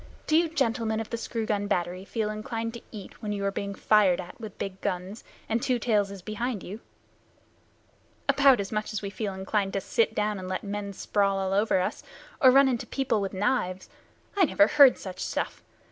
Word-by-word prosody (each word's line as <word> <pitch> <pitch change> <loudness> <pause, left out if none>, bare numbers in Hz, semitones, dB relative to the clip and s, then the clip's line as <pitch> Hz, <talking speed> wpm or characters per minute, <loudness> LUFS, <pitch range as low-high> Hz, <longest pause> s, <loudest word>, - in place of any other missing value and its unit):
"Do 310 - +2
you 330 0 +4
gentlemen 230 -7 0
of 225 - -6
the - - -1
screw 230 -1 -3
gun 205 -2 -1
battery 180 -1 -2
feel 215 0 -2
inclined 225 +1 -4
to 235 - -8
eat 210 -1 -10
when 210 -2 -3
you 200 -1 -3
are 195 - +1
being 200 0 -4
fired 200 -5 +4
at 185 +5 -9
with 215 -3 -8
big 190 -1 -5
guns, 185 +4 -3 0.2
and 225 +1 0
Two 255 -1 +1
Tails 215 -4 +1
is 195 -2 -9
behind 215 0 -3
you?" 205 +4 -7 1.5
"About 275 -4 +5
as 200 -1 -3
much 215 0 -2
as 210 - -3
we 200 - -4
feel 205 -2 -4
inclined 195 +1 -1
to 195 - -1
sit 220 +3 +1
down 210 -1 0
and 185 - -6
let 185 0 -3
men 205 0 -4
sprawl 195 0 0
all 190 0 -1
over 205 -1 +2
us, 185 - -2 0.4
or 260 - +8
run 270 +2 +6
into 245 -3 -1
people 265 -6 0
with 195 - -2
knives. 190 -2 -1 0.5
I 390 -3 +5
never 200 - +4
heard 270 +4 +7
such 185 -1 -8
stuff. - - -3
210 Hz, 205 wpm, -27 LUFS, 195-230 Hz, 1.5 s, or